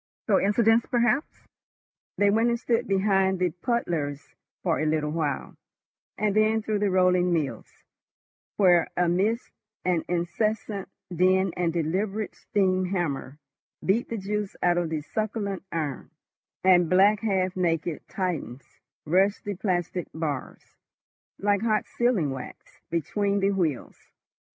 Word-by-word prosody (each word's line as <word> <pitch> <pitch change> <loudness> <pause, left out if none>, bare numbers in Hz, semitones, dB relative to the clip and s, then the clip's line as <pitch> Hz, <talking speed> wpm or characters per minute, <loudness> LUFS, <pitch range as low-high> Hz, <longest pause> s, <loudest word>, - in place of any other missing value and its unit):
Coincidence, 225 +3 +3
perhaps? 240 +4 0 0.7
They 205 0 +4
went 225 +3 +3
and 235 0 0
stood 235 -1 0
behind 195 -1 +2
the 180 -1 +1
puddlers 170 - -2 0.3
for 170 -3 +1
a 155 - 0
little 150 -1 0
while, 150 -4 -2 0.6
and 210 -1 0
then 215 +1 +3
through 215 -1 -1
the 205 -1 +1
rolling 180 -1 +3
mills, 140 -9 -1 0.9
where 180 -4 +5
amidst 185 +7 +1 0.3
an 175 -3 +1
incessant 195 +4 -2 0.3
din 185 +1 +3
the 175 -1 0
deliberate 190 +6 -2
steam 185 -2 0
hammer 165 -7 -3 0.5
beat 215 +6 +1
the 230 - -3
juice 205 0 -3
out 175 0 +3
of 170 -2 -2
the 160 -2 -2
succulent 205 +2 -3
iron, 150 -5 -3 0.5
and 180 -3 +5
black, 200 +3 +5
half 190 -3 0
naked 165 -3 -1
Titans 160 -9 -4 0.3
rushed 190 +6 +2
the 205 - -3
plastic 180 -2 -2
bars, 155 -4 -5 0.6
like 200 0 +1
hot 220 -2 +1
sealing 230 - +1
wax, 130 -1 -9
between 200 +5 0
the 195 +1 +2
wheels. 165 -10 -2
185 Hz, 125 wpm, -26 LUFS, 170-210 Hz, 0.9 s, where